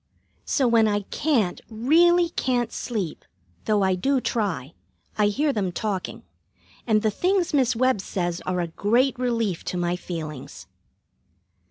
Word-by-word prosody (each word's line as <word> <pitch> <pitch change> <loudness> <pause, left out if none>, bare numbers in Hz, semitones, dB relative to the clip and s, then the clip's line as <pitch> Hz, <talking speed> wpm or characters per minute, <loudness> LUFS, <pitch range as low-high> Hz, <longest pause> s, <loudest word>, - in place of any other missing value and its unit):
So 270 -4 +1
when 230 -2 +4
I 205 -1 +1
can't, 250 - 0
really 335 +10 +4
can't, 245 -7 -1
sleep, 200 -10 -4 0.4
though 210 -2 +2
I 190 0 +3
do 265 +9 +1
try, 195 - -2 0.4
I 210 -1 +3
hear 285 +8 +1
them 195 -5 -1
talking, 195 +1 -4 0.6
and 215 -1 +3
the 215 - +2
things 365 - 0
Miss 255 -4 +2
Webb 255 -3 +2
says 175 -2 -3
are 180 -1 0
a 170 - -2
great 240 +9 +1
relief 230 -8 -1
to 180 - -3
my 175 0 0
feelings. 155 -6 -7
220 Hz, 145 wpm, -24 LUFS, 185-255 Hz, 0.6 s, when